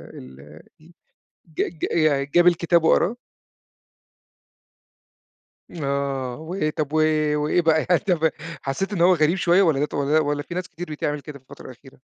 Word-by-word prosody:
ال 70 Hz, +4 st, -13 dB, 0.2 s
ي 165 Hz, +2 st, -19 dB, 0.6 s
ج 155 Hz, -, -3 dB, 0.2 s
ج -, -, -4 dB
يعني 145 Hz, -4 st, +1 dB
جاب 175 Hz, +5 st, +3 dB
الكتاب 170 Hz, -1 st, +3 dB
وقراه؟ 200 Hz, +7 st, +2 dB, 2.6 s
آه. 140 Hz, -4 st, -3 dB
وإيه 160 Hz, +1 st, -3 dB
طب 150 Hz, -1 st, -4 dB
و -, -, 0 dB, 0.4 s
وإيه 150 Hz, +4 st, +1 dB
بقى 160 Hz, -1 st, +2 dB
يعني 175 Hz, -, +4 dB
طب 170 Hz, -5 st, +1 dB, 0.3 s
حسّيت 190 Hz, +10 st, -3 dB
إنه 170 Hz, -3 st, +1 dB
هو 185 Hz, -, +5 dB
غريب 160 Hz, +2 st, +2 dB
شوية 175 Hz, +2 st, +3 dB
والّا 160 Hz, -7 st, +2 dB
ده 150 Hz, -, +1 dB
ط -, -, -15 dB
والّا 145 Hz, +2 st, +1 dB
والّا 145 Hz, -1 st, -1 dB
في -, -, -9 dB
ناس 180 Hz, -, -4 dB
كتير 175 Hz, -2 st, -8 dB
بتعمل 150 Hz, -1 st, -3 dB
كده 145 Hz, -2 st, -10 dB
في -, -, -33 dB
الفترة 140 Hz, -, -14 dB
الأخيرة؟ 130 Hz, +1 st, -14 dB
155 Hz, 170 wpm, -22 LUFS, 140-170 Hz, 2.6 s, هو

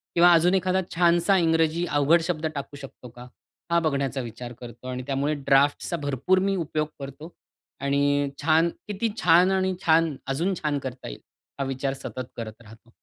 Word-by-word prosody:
किंवा 175 Hz, +1 st, +7 dB
अजून 170 Hz, +2 st, +4 dB
एखादा 185 Hz, 0 st, +1 dB
छानसा 175 Hz, +3 st, +3 dB
इंग्रजी 165 Hz, 0 st, +2 dB
अवघड 150 Hz, +1 st, +3 dB
शब्द 165 Hz, -2 st, -2 dB
टाकू 140 Hz, 0 st, -6 dB
शकतो 135 Hz, -2 st, -11 dB
का? 125 Hz, +1 st, -12 dB, 0.4 s
हा 170 Hz, -, +4 dB
बघण्याचा 140 Hz, -4 st, -1 dB
विचार 120 Hz, +1 st, -8 dB
करतो 120 Hz, +1 st, -10 dB
आणि 125 Hz, 0 st, -4 dB
त्यामुळे 140 Hz, +2 st, 0 dB
ड्राफ्ट्सचा 140 Hz, +5 st, +2 dB
भरपूर 145 Hz, +7 st, +1 dB
मी 195 Hz, -, 0 dB
उपयोग 155 Hz, -3 st, -2 dB
करतो 140 Hz, +4 st, -9 dB, 0.5 s
आणि 140 Hz, 0 st, +1 dB
छान 160 Hz, +2 st, +4 dB, 0.2 s
किती 210 Hz, +2 st, -2 dB
छान 175 Hz, +2 st, +5 dB
आणि 190 Hz, 0 st, +1 dB
छान, 160 Hz, -2 st, +3 dB
अजून 165 Hz, +8 st, 0 dB
छान 150 Hz, -2 st, 0 dB
करता 130 Hz, -1 st, -7 dB
येईल, -, -, -10 dB, 0.4 s
हा -, -, 0 dB
विचार 135 Hz, 0 st, -2 dB
सतत 130 Hz, -1 st, -5 dB
करत 110 Hz, -1 st, -7 dB
राहतो. 115 Hz, +1 st, -17 dB
150 Hz, 165 wpm, -25 LUFS, 135-170 Hz, 0.5 s, किंवा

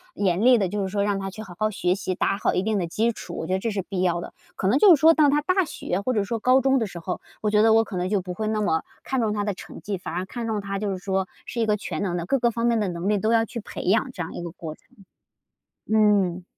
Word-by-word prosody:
严 190 Hz, -1 st, +1 dB
厉 250 Hz, -1 st, +7 dB
的， 195 Hz, -3 st, +1 dB
就 205 Hz, +2 st, -3 dB
是 190 Hz, -, -1 dB
说 200 Hz, 0 st, 0 dB
让 200 Hz, -1 st, 0 dB
他 195 Hz, 0 st, -4 dB
去 215 Hz, +3 st, -8 dB
好 180 Hz, -, -11 dB
好 215 Hz, 0 st, +2 dB
学 180 Hz, -3 st, 0 dB
习， 185 Hz, -1 st, -3 dB
打 195 Hz, -, 0 dB
好 -, -, +1 dB
一 185 Hz, -, +1 dB
定 215 Hz, -2 st, 0 dB
的 170 Hz, -, -2 dB
基 225 Hz, +7 st, +1 dB
础， -, -, -8 dB
我 -, -, -3 dB
觉 185 Hz, -, -2 dB
得 190 Hz, -, +1 dB
这 225 Hz, -, -2 dB
是 200 Hz, -3 st, -2 dB
必 190 Hz, -2 st, -3 dB
要 175 Hz, -2 st, +1 dB
的。 -, -, -8 dB, 0.2 s
可 190 Hz, -, -1 dB
能 255 Hz, +8 st, +3 dB
就 375 Hz, -6 st, +8 dB
是 -, -, -6 dB
说 325 Hz, +1 st, +7 dB
当 300 Hz, -3 st, +4 dB
他 295 Hz, +1 st, +2 dB
大 370 Hz, +4 st, +2 dB
学 195 Hz, -, -3 dB
或 255 Hz, +4 st, -1 dB
者 210 Hz, -3 st, +1 dB
说 225 Hz, +2 st, -3 dB
高 255 Hz, +3 st, +4 dB
中 265 Hz, 0 st, +3 dB
的 225 Hz, -, -1 dB
时 175 Hz, -, -10 dB
候， 170 Hz, +2 st, -4 dB, 0.2 s
我 210 Hz, -1 st, 0 dB
觉 210 Hz, 0 st, +4 dB
得 220 Hz, 0 st, +5 dB
我 225 Hz, 0 st, +5 dB
可 200 Hz, -, -8 dB
能 180 Hz, +1 st, -1 dB
就 205 Hz, -3 st, +1 dB
不 180 Hz, 0 st, -6 dB
会 215 Hz, +3 st, -3 dB
那 215 Hz, 0 st, 0 dB
么 160 Hz, -6 st, +1 dB, 0.2 s
看 265 Hz, -2 st, -1 dB
中 215 Hz, -2 st, +1 dB
他 205 Hz, -1 st, -1 dB
的 205 Hz, -1 st, -1 dB
成 -, -, -11 dB
绩， 200 Hz, -2 st, -3 dB
反 170 Hz, -, -6 dB
而 185 Hz, +1 st, -2 dB
看 230 Hz, +3 st, -5 dB
中 215 Hz, -2 st, -1 dB
他 195 Hz, 0 st, -4 dB
就 210 Hz, -1 st, -2 dB
是 190 Hz, -, -3 dB
说 190 Hz, 0 st, -1 dB, 0.2 s
是 235 Hz, -, -5 dB
一 225 Hz, -, +2 dB
个 210 Hz, 0 st, +2 dB
全 -, -, -5 dB
能 180 Hz, -3 st, -1 dB
的 170 Hz, -, -3 dB
各 275 Hz, +6 st, +1 dB
个 235 Hz, -, +3 dB
方 230 Hz, +1 st, -2 dB
面 235 Hz, -2 st, +3 dB
的 205 Hz, -, 0 dB
能 175 Hz, +3 st, -3 dB
力 210 Hz, -2 st, +2 dB
都 220 Hz, +3 st, +1 dB
要 225 Hz, -1 st, +3 dB
去 235 Hz, -, -6 dB
培 -, -, -7 dB
养 225 Hz, +7 st, +2 dB
这 180 Hz, -7 st, -5 dB
样 -, -, -7 dB
一 -, -, -6 dB
个 170 Hz, -, -5 dB
过 160 Hz, -2 st, -7 dB
程。 -, -, -22 dB, 1.1 s
嗯， 200 Hz, -5 st, +3 dB
205 Hz, 345 characters per minute, -24 LUFS, 185-225 Hz, 1.1 s, 就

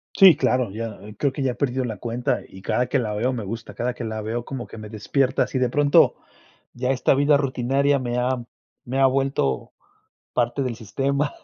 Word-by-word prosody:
Sí, 190 Hz, -6 st, +9 dB
claro, 125 Hz, -4 st, +1 dB
ya, 115 Hz, +2 st, -4 dB
ah, 105 Hz, +1 st, -11 dB
creo 140 Hz, -3 st, 0 dB
que 140 Hz, -, -4 dB
ya 130 Hz, -, +1 dB
he -, -, -14 dB
perdido 130 Hz, 0 st, -1 dB
la 110 Hz, -4 st, -4 dB
cuenta, 120 Hz, +2 st, -1 dB
y 95 Hz, -, -13 dB
cada 125 Hz, +5 st, +1 dB
que 135 Hz, -, +1 dB
la 110 Hz, -3 st, -2 dB
veo 125 Hz, +5 st, 0 dB
me 115 Hz, -4 st, -4 dB
gusta, 115 Hz, +3 st, -6 dB
cada 125 Hz, +1 st, -2 dB
que 125 Hz, -, -6 dB
la 110 Hz, -1 st, -3 dB
veo 115 Hz, +3 st, -3 dB
como 130 Hz, -3 st, -6 dB
que -, -, -11 dB
me 110 Hz, -1 st, -8 dB
despierta, 125 Hz, +5 st, 0 dB
si 130 Hz, -, -3 dB
de 125 Hz, -1 st, +2 dB
pronto 145 Hz, +2 st, +4 dB, 0.6 s
ya 125 Hz, +1 st, -2 dB
esta 130 Hz, -, +2 dB
vida 145 Hz, +2 st, +4 dB
rutinaria 140 Hz, +1 st, +1 dB
me 120 Hz, -1 st, -2 dB
ha 125 Hz, 0 st, 0 dB, 0.4 s
me 130 Hz, +2 st, -2 dB
ha 135 Hz, -, +7 dB
vuelto 130 Hz, -, 0 dB, 0.6 s
parte 120 Hz, +3 st, 0 dB
del 125 Hz, -3 st, -2 dB
sistema 135 Hz, +6 st, -1 dB
125 Hz, 215 wpm, -23 LUFS, 115-135 Hz, 0.6 s, Sí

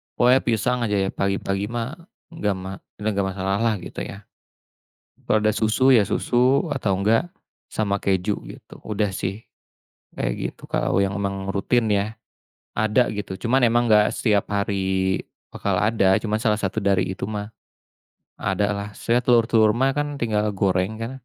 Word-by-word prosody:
pokoknya 125 Hz, +2 st, +5 dB
pisang 125 Hz, +1 st, 0 dB
aja 105 Hz, -3 st, 0 dB
ya 95 Hz, -1 st, +1 dB
pagi-pagi 100 Hz, 0 st, -1 dB
mah 120 Hz, +2 st, -3 dB, 0.4 s
nggak 105 Hz, -, -1 dB
ma 95 Hz, +1 st, -7 dB, 0.2 s
nggak 105 Hz, -2 st, -1 dB
masalah 95 Hz, +1 st, -1 dB
lah 115 Hz, -1 st, +2 dB
gitu -, -, -8 dB
ya, 100 Hz, +2 st, -9 dB, 1.0 s
kalau 110 Hz, -, +2 dB
ada 105 Hz, 0 st, +1 dB
susu 130 Hz, +5 st, +4 dB
ya 110 Hz, -, +5 dB
susu 125 Hz, -, +2 dB
atau 100 Hz, -9 st, 0 dB
enggak, 115 Hz, -, +2 dB, 0.4 s
sama 100 Hz, -2 st, 0 dB
keju 100 Hz, +1 st, +1 dB
gitu -, -, -12 dB
udah 105 Hz, -1 st, -1 dB
sih, 95 Hz, +3 st, -3 dB, 0.7 s
kayak -, -, -2 dB, 0.2 s
gitu -, -, -15 dB
kalau 90 Hz, -, +1 dB
yang 100 Hz, 0 st, 0 dB
memang 100 Hz, -1 st, -3 dB
rutin 110 Hz, +4 st, +1 dB
ya, 105 Hz, +1 st, -1 dB, 0.5 s
ada 110 Hz, +3 st, +2 dB
gitu 100 Hz, -3 st, -5 dB
cuman 120 Hz, +5 st, +2 dB
emang 120 Hz, +1 st, +3 dB
nggak 105 Hz, 0 st, +4 dB
setiap 105 Hz, -4 st, +1 dB
hari 95 Hz, -2 st, 0 dB, 0.3 s
bakal -, -, -1 dB
ada 105 Hz, -3 st, +3 dB
cuman 110 Hz, -1 st, 0 dB
salah 110 Hz, -2 st, +2 dB
satu 100 Hz, +1 st, -2 dB
dari 100 Hz, -2 st, +1 dB
itu 95 Hz, -, -5 dB
mah, 105 Hz, 0 st, -5 dB, 0.8 s
ada 100 Hz, +2 st, 0 dB
lah 100 Hz, +1 st, -5 dB
saya 120 Hz, +4 st, 0 dB
telur-telur 115 Hz, -3 st, +4 dB
mah 135 Hz, +4 st, +1 dB, 0.2 s
tinggal 110 Hz, -3 st, 0 dB
goreng 95 Hz, +2 st, 0 dB
kan, 115 Hz, +2 st, -4 dB
105 Hz, 155 wpm, -23 LUFS, 100-115 Hz, 1.0 s, pokoknya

